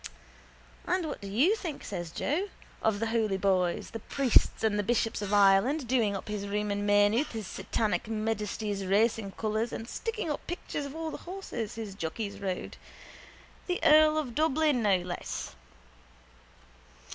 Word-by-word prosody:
—And 365 -3 +1
what 295 -8 -5
do 200 - -6
you 270 - +3
think, 340 -9 -6
says 175 -4 -5
Joe, 335 - -1 0.3
of 220 -2 +1
the 225 - 0
holy 215 -4 +1
boys, 185 -3 +1
the 225 - -5
priests 260 0 +2
and 210 -1 +2
bishops 225 -2 +1
of 205 -1 -3
Ireland 205 +8 +4
doing 225 -5 +2
up 195 - -6
his 210 -1 -3
room 210 +1 -1
in 205 0 -1
Maynooth 205 +6 +3
in 220 - -2
His - - -8
Satanic 215 +2 -1
Majesty's 215 -2 -2
racing 200 +1 +1
colours 220 +2 -1
and 225 - -5
sticking 440 - -3
up 295 - -5
pictures 295 -4 -4
of 280 - -9
all 320 -1 -3
the - - -5
horses 360 - -5
his 220 -3 -5
jockeys 200 +3 -4
rode. 190 -2 -4 0.9
The 360 -1 0
earl 310 0 +6
of 280 -6 -2
Dublin, 305 -2 +2
no 200 -3 +4
less. 175 - -5
220 Hz, 160 wpm, -29 LUFS, 200-280 Hz, 0.9 s, earl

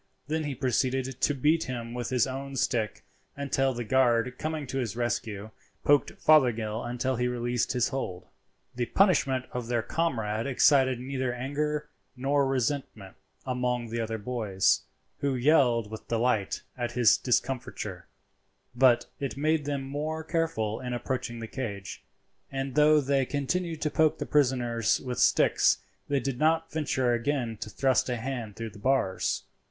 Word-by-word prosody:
Then 155 +2 -2
he 145 -2 -3
proceeded 130 +1 -1
to 145 - +2
beat 155 +5 +2
him 120 -2 -5
with 120 -2 -3
his 125 -2 +2
own 135 +1 -5
stick 115 -4 -1 0.3
until 135 -1 +1
the 120 -1 -4
guard, 125 0 +2
coming 155 -1 -3
to 135 +1 -3
his 115 -4 -3
rescue, 115 -3 -3 0.3
poked 145 0 +3
Fothergill 115 -7 +3
until 125 +1 -2
he 125 +1 +1
released 120 0 -1
his 125 -2 +1
hold. 110 -10 -4 0.5
The 120 -1 -2
punishment 140 - +3
of 125 -2 -4
their 120 -2 0
comrade 115 -10 -1
excited 130 -1 +4
neither 130 0 -2
anger 150 +4 -2 0.3
nor 140 +2 +1
resentment 130 -6 -2 0.3
among 125 -2 -1
the 115 0 -1
other 110 0 -3
boys, 105 -4 +1 0.4
who 140 -2 0
yelled 120 -5 +3
with 110 - -8
delight 115 -4 0
at 120 -1 -3
his 120 -2 +5
discomfiture; 125 0 -2 0.7
but 120 -1 +4
it 135 -1 -4
made 155 +1 +1
them 140 -2 -2
more 150 +4 -3
careful 155 -10 -1
in 125 -1 -4
approaching 120 0 -3
the 115 -1 -6
cage, 100 -7 -6 0.5
and 135 -1 -3
though 150 +1 +5
they 135 0 +2
continued 160 +5 -2
to 150 - 0
poke 155 +1 +3
the - - -4
prisoners 125 -6 +2
with 125 -2 -4
sticks - - +4 0.3
they 140 -1 +1
did 130 -1 -3
not 160 +1 +2
venture 130 -5 0
again 120 -1 -1
to 105 - -6
thrust 130 +5 +1
a 125 - -1
hand 115 -3 -5
through 115 -1 -5
the 105 - -13
bars. 125 -5 0
130 Hz, 155 wpm, -28 LUFS, 120-140 Hz, 0.7 s, his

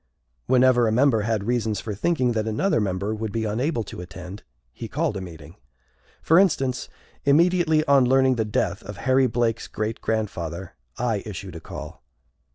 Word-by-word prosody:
Whenever 125 -2 +4
a - - +1
member 120 -1 +3
had 105 -1 -1
reasons 110 -2 -1
for 110 - -5
thinking 125 - +1
that 110 -1 -1
another 110 - +1
member 100 +1 -1
would 110 -1 -4
be 115 0 -2
unable 115 +4 -1
to 95 - -8
attend, 90 +2 -9 0.3
he - - -7
called 105 - -1
a 95 - -4
meeting. 80 -2 -11 0.7
For 165 +3 +5
instance, 135 -9 +1 0.3
immediately 160 +1 +3
on 140 -3 +5
learning 130 0 +4
the 110 - +1
death 105 -1 -1
of 105 -2 -9
Harry 130 +3 +3
Blake's 115 -1 -1
great 110 +1 -4
grandfather, 95 -5 -3 0.2
I 115 -4 0
issued 95 -3 -7
a - - -6
call. - - -9
110 Hz, 165 wpm, -24 LUFS, 100-130 Hz, 0.7 s, For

